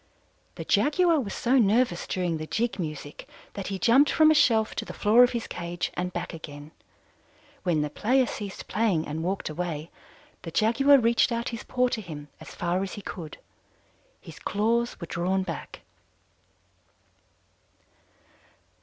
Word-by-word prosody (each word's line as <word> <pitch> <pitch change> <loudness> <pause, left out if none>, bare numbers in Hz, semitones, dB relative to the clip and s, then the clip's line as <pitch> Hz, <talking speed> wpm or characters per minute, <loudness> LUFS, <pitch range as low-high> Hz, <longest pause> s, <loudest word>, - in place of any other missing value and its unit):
"The - - -7
Jaguar 335 +1 +3
was 215 -7 -4
so 260 +2 +2
nervous 215 -3 +2
during 175 -3 -1
the 155 0 -6
jig 230 +1 -1
music 150 -3 -6 0.2
that 195 - -5
he 195 - -3
jumped 255 +8 +4
from 315 0 +5
a - - +6
shelf 225 -7 +3
to - - -1
the - - -9
floor 225 +4 +5
of 245 - +3
his 235 -1 -2
cage 170 0 -4
and 180 0 -3
back - - -5
again. 150 -2 -9 0.9
When 165 -5 +1
the 150 - -2
player 255 - +2
ceased 205 -4 -7
playing 205 -8 0
and 155 +2 -4
walked 190 +3 -2
away, 160 0 -4 0.5
the 165 - -7
Jaguar 250 - +4
reached 235 -1 +3
out 235 0 -1
his 230 -2 -6
paw 250 0 +1
to 235 -3 -3
him 150 -6 -9
as - - -11
far 175 +1 -1
as 195 - -4
he 205 - -8
could. 165 -5 -7 0.8
His - - -12
claws 230 +4 0
were 170 - -5
drawn 185 +3 -1
back. - - -7
200 Hz, 160 wpm, -26 LUFS, 170-235 Hz, 0.9 s, a